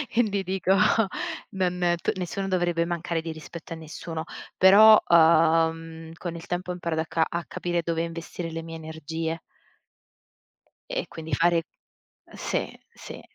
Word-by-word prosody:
e 240 Hz, -, +5 dB
vi 200 Hz, -3 st, -1 dB
dico: 190 Hz, 0 st, +1 dB, 0.8 s
"Non 180 Hz, -2 st, 0 dB
t -, -, -1 dB
nessuno 190 Hz, +2 st, -3 dB
dovrebbe 175 Hz, -3 st, +1 dB
mancare 170 Hz, -1 st, -2 dB
di 160 Hz, 0 st, -5 dB
rispetto 160 Hz, +1 st, -9 dB
a -, -, -5 dB
nessuno". 160 Hz, 0 st, -6 dB, 0.3 s
Però, 210 Hz, +3 st, +9 dB
uhm, 165 Hz, 0 st, +3 dB
con 170 Hz, 0 st, -6 dB
il 165 Hz, -, -10 dB
tempo 180 Hz, +1 st, -4 dB
ho -, -, -2 dB
imparato 170 Hz, -2 st, -2 dB
a -, -, -3 dB
ca 160 Hz, 0 st, +1 dB
a 170 Hz, 0 st, -3 dB
capire 175 Hz, -1 st, -2 dB
dove 165 Hz, 0 st, -1 dB
investire 165 Hz, 0 st, -6 dB
le 165 Hz, 0 st, -5 dB
mie 165 Hz, 0 st, -7 dB
energie 160 Hz, +1 st, -5 dB, 1.5 s
e -, -, -3 dB
quindi 160 Hz, -2 st, -8 dB
fare 170 Hz, +2 st, +3 dB, 0.7 s
sì, -, -, -2 dB, 0.3 s
sì. -, -, -10 dB
170 Hz, 150 wpm, -26 LUFS, 160-180 Hz, 1.5 s, Però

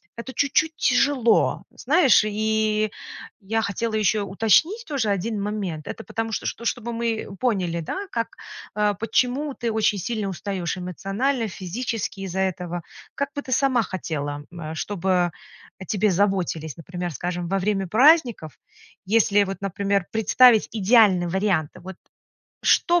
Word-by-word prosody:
это 235 Hz, +3 st, -7 dB
чуть-чуть 310 Hz, +4 st, +1 dB
тяжело. 255 Hz, -2 st, +2 dB
Знаешь? 280 Hz, -4 st, +4 dB
И 215 Hz, 0 st, 0 dB, 0.5 s
я 225 Hz, +3 st, -1 dB
хотела 220 Hz, +2 st, -2 dB
ещё 210 Hz, -1 st, +1 dB
уточнить 225 Hz, -, +2 dB
тоже 270 Hz, -8 st, -1 dB
1 205 Hz, +2 st, -1 dB
момент, 195 Hz, -7 st, -4 dB
это 225 Hz, -, -6 dB
потому 225 Hz, 0 st, -4 dB
что -, -, -3 dB
что 235 Hz, -, -4 dB
чтобы 235 Hz, 0 st, -2 dB
мы 230 Hz, -1 st, -2 dB
поняли, 185 Hz, -9 st, 0 dB
да, 390 Hz, -, -5 dB
как, 230 Hz, -1 st, -3 dB, 0.4 s
э, 210 Hz, -1 st, +2 dB
почему 255 Hz, +5 st, 0 dB
ты 235 Hz, -2 st, -2 dB
очень 215 Hz, -1 st, +1 dB
сильно 215 Hz, 0 st, -3 dB
устаешь 190 Hz, -1 st, -3 dB
эмоционально, 200 Hz, -, -2 dB
физически 210 Hz, +2 st, -4 dB
из-за 190 Hz, 0 st, -3 dB
этого. 175 Hz, -2 st, -3 dB, 0.3 s
Как 280 Hz, 0 st, -1 dB
бы 285 Hz, -, -2 dB
ты 260 Hz, -, -9 dB
сама 255 Hz, -2 st, +3 dB
хотела, 145 Hz, -6 st, -4 dB
э, 160 Hz, -2 st, -7 dB
чтобы 180 Hz, -1 st, 0 dB, 0.5 s
о 190 Hz, -, -8 dB
тебе 210 Hz, -1 st, +1 dB
заботились, 180 Hz, -6 st, 0 dB
например, 175 Hz, +1 st, -5 dB
скажем, 175 Hz, +4 st, -4 dB
во 195 Hz, +3 st, 0 dB
время 195 Hz, -1 st, -1 dB
праздников, 245 Hz, -, +4 dB, 0.5 s
если, 205 Hz, -1 st, +3 dB
вот 195 Hz, 0 st, -6 dB
например, 200 Hz, -1 st, 0 dB
представить 225 Hz, +1 st, +5 dB
идеальный 205 Hz, -4 st, +4 dB
вариант, 185 Hz, -4 st, 0 dB
вот. 190 Hz, +1 st, -9 dB, 0.7 s
Что 345 Hz, 0 st, +4 dB
210 Hz, 140 wpm, -23 LUFS, 185-235 Hz, 0.7 s, представить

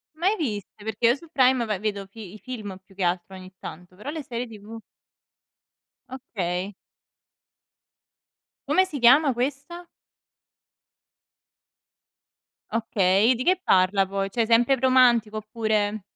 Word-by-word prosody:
Mai 370 Hz, +7 st, +1 dB
viste, 210 Hz, -, -5 dB
perché 220 Hz, +2 st, 0 dB
io 240 Hz, -, +4 dB
su 335 Hz, +4 st, -15 dB
Prime 255 Hz, -3 st, +3 dB
va 210 Hz, -3 st, -2 dB
vedo 200 Hz, -1 st, -3 dB
fi 200 Hz, -2 st, -11 dB
i 215 Hz, -, -12 dB
film 215 Hz, -7 st, -7 dB
più 195 Hz, 0 st, -22 dB
che 195 Hz, -, -3 dB
altro 180 Hz, +2 st, -2 dB
ogni 185 Hz, 0 st, -12 dB
tanto, 180 Hz, +2 st, -10 dB
però 210 Hz, +9 st, -8 dB
le 310 Hz, 0 st, -5 dB
serie 245 Hz, -1 st, -5 dB
TV 220 Hz, +1 st, -11 dB, 1.3 s
Okay. 195 Hz, -7 st, -4 dB, 1.9 s
Come 375 Hz, -, +4 dB
si 305 Hz, -7 st, -5 dB
chiama 275 Hz, +5 st, +6 dB
questa? 285 Hz, +8 st, -4 dB, 2.9 s
Okay. 215 Hz, -1 st, +2 dB
E 255 Hz, -, +2 dB
di 250 Hz, -, -3 dB
che 370 Hz, +3 st, +2 dB
parla 190 Hz, +1 st, +3 dB
poi? 195 Hz, 0 st, -3 dB
Cioè, 230 Hz, +3 st, 0 dB
sempre 235 Hz, +4 st, +4 dB
romantico, 240 Hz, -4 st, +3 dB
oppure 215 Hz, -1 st, -1 dB
225 Hz, 130 wpm, -24 LUFS, 195-255 Hz, 2.9 s, chiama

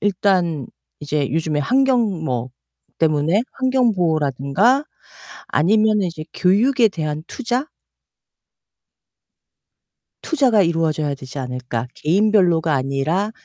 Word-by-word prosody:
일단 180 Hz, -, 0 dB, 0.3 s
이제 145 Hz, -3 st, -2 dB
요즘에 155 Hz, -1 st, -1 dB
환경 240 Hz, -, +1 dB
뭐 125 Hz, -2 st, -3 dB, 0.5 s
때문에 160 Hz, +6 st, +2 dB
환경 260 Hz, -3 st, +1 dB
보호라든가 160 Hz, -, +1 dB, 0.6 s
아니면은 215 Hz, +5 st, +2 dB
이제 155 Hz, -2 st, -8 dB
교육에 225 Hz, +6 st, +3 dB
대한 155 Hz, -4 st, -4 dB
투자? 255 Hz, +3 st, -3 dB, 2.5 s
투자가 260 Hz, -, +2 dB
이루어져야 160 Hz, -4 st, 0 dB
되지 130 Hz, +1 st, -9 dB
않을까? 125 Hz, -2 st, -4 dB
개인별로가 175 Hz, -3 st, +2 dB
아니라 140 Hz, +9 st, -1 dB
165 Hz, 240 characters per minute, -20 LUFS, 150-215 Hz, 2.5 s, 교육에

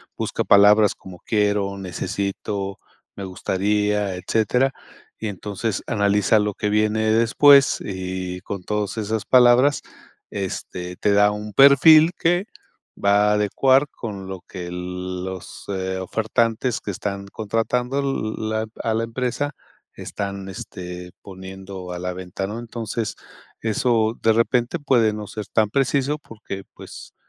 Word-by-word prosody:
busca -, -, -2 dB
palabras 105 Hz, +1 st, +6 dB
como 90 Hz, -2 st, -12 dB
quiero, 100 Hz, -2 st, 0 dB
necesito, 100 Hz, +1 st, -4 dB, 0.4 s
me 100 Hz, -, -5 dB
gustaría, 105 Hz, +1 st, 0 dB
etcétera, 115 Hz, +8 st, +1 dB, 0.5 s
y 110 Hz, -, -3 dB
entonces 105 Hz, +2 st, -3 dB
analiza 105 Hz, -1 st, +2 dB
lo 105 Hz, -1 st, 0 dB
que 105 Hz, -, -2 dB
viene 110 Hz, +1 st, +2 dB
después 135 Hz, +5 st, +5 dB
y 95 Hz, -1 st, -4 dB
con 95 Hz, 0 st, -6 dB
todas 105 Hz, +2 st, -2 dB
esas 110 Hz, 0 st, -2 dB
palabras, 125 Hz, +3 st, +5 dB, 0.5 s
este, 90 Hz, -2 st, -5 dB
te 105 Hz, -, +1 dB
da 105 Hz, +1 st, +5 dB
un 105 Hz, 0 st, -6 dB
perfil 155 Hz, +4 st, +7 dB
que 175 Hz, +4 st, +2 dB, 0.6 s
va 100 Hz, +1 st, +4 dB
a -, -, +3 dB
adecuar 130 Hz, +7 st, +3 dB
con 100 Hz, -5 st, -7 dB
lo 95 Hz, -1 st, -7 dB
que 90 Hz, -2 st, -8 dB
los, 90 Hz, +1 st, -6 dB
eh, 95 Hz, -1 st, -2 dB
ofertantes 110 Hz, +4 st, 0 dB
que 100 Hz, -, -4 dB
están 100 Hz, +1 st, -4 dB
contratando 120 Hz, +5 st, -1 dB, 0.4 s
la, 110 Hz, 0 st, -2 dB, 0.2 s
a 115 Hz, -, 0 dB
la 115 Hz, -, 0 dB
empresa 130 Hz, +4 st, -3 dB, 0.4 s
están, 100 Hz, -1 st, -5 dB
este, 90 Hz, -2 st, -8 dB
poniendo 95 Hz, -1 st, -9 dB
a -, -, -5 dB
la 90 Hz, 0 st, -3 dB
venta, 95 Hz, +1 st, -5 dB
¿no? 110 Hz, +4 st, -5 dB
Entonces 115 Hz, -1 st, -4 dB, 0.5 s
eso 115 Hz, 0 st, +1 dB
de 110 Hz, 0 st, +4 dB
repente 120 Hz, +6 st, +1 dB
puede 120 Hz, -7 st, +2 dB
no 105 Hz, 0 st, -6 dB
ser 105 Hz, 0 st, -7 dB
tan 110 Hz, +1 st, +1 dB
preciso 140 Hz, +2 st, +1 dB
porque, 105 Hz, -7 st, -8 dB
pues, -, -, -11 dB
105 Hz, 130 wpm, -22 LUFS, 95-115 Hz, 0.6 s, perfil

